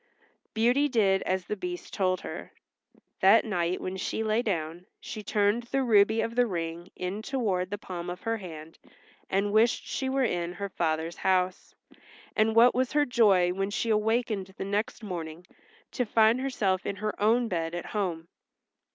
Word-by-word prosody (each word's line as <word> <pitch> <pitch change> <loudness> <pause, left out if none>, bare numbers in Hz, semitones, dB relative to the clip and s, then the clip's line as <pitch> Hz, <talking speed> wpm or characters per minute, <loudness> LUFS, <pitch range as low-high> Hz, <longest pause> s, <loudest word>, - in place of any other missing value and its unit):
Beauty 245 +6 +3
did 200 -6 +3
as 185 -1 0
the 210 - -3
Beast 180 -3 -6
told 185 -1 0
her. - - -8 0.7
That 200 +5 +6
night 180 -4 -1
when 185 +1 -4
she 220 +3 -2
lay 220 +1 +1
down 175 -4 -3
she 215 - -7
turned 210 +2 +1
the 265 +3 -1
ruby 220 -1 +4
of 230 - -2
the 245 0 +3
ring 170 -2 -4
in 185 +4 -4
toward 210 -9 -1
the 205 - -3
palm 175 -3 -6
of 180 +1 -6
her 225 0 -1
hand 165 -5 -10 0.5
and 200 +2 0
wished 225 +2 +3
she 265 - -2
were 270 0 +1
in 175 -6 -1
her 200 +2 -5
father's 165 -1 -2
house, 185 -1 0 0.6
and 220 +1 +2
what 240 +2 +7
was 255 +2 0
her 295 0 +3
joy, 200 -8 +4
when 195 +1 -2
she 225 +2 -1
awakened 215 -3 0
the - - -4
next 205 +3 -2
morning, 170 -3 -6 0.5
to 250 - 0
find 225 +1 +3
herself 200 -8 0
in 200 - -3
her 210 +1 -3
own 230 +3 +3
bed 165 -4 -2
at 175 - -5
home. 175 -6 -3
200 Hz, 175 wpm, -28 LUFS, 180-225 Hz, 0.7 s, what